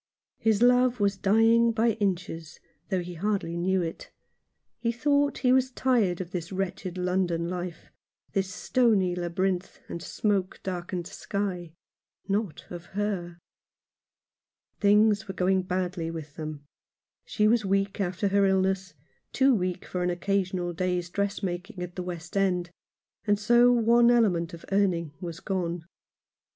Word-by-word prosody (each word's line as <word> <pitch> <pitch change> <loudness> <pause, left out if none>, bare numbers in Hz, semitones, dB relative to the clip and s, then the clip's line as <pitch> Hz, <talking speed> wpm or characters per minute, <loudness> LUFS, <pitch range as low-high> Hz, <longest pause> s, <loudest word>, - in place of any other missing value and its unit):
His 220 0 +2
love 250 0 +4
was 200 -1 +2
dying 225 +4 +4
by 230 +1 +2
inches, 185 -6 -3 0.3
though 190 -3 0
he 175 0 -7
hardly 190 -1 -1
knew 185 +1 +1
it. 165 - -6 0.7
He 235 - 0
thought 285 +3 +1
he 250 - +6
was 260 0 +3
tired 240 -9 +1
of 180 -2 -5
this 170 -2 -4
wretched 185 -1 -3
London 180 -2 0
life 175 -1 -6 0.2
— - - -43
this 190 -1 0
stony 210 -7 +2
labyrinth, 180 +1 -2
and 170 - -6
smoke 195 0 -1
darkened 180 -1 -4
sky 180 -3 -4 0.3
— - - -45
not 205 -8 -5
of 175 -1 -7
her. 180 -5 -2 1.4
Things 210 +1 +4
were 190 - -6
going 185 +1 +2
badly 180 -2 -2
with 155 -3 -7
them. 155 -2 -6 0.6
She 210 -1 +1
was 225 0 +3
weak 195 +1 0
after 190 +2 0
her 200 0 +3
illness 190 0 0 0.2
— - - -44
too 270 0 +4
weak 180 -4 -1
for 180 - -4
an 180 - +1
occasional 180 -1 -1
day's 180 0 -1
dressmaking 195 -1 -3
at 180 0 -8
the 185 - -3
West 175 -1 -7
End, 180 -3 +1 0.6
and 205 0 +4
so 240 +4 +5
one 235 0 +5
element 190 -9 +3
of 170 - -14
earning 180 -6 +1
was 170 -1 -6
gone. 175 -4 -3
190 Hz, 145 wpm, -27 LUFS, 175-210 Hz, 1.4 s, he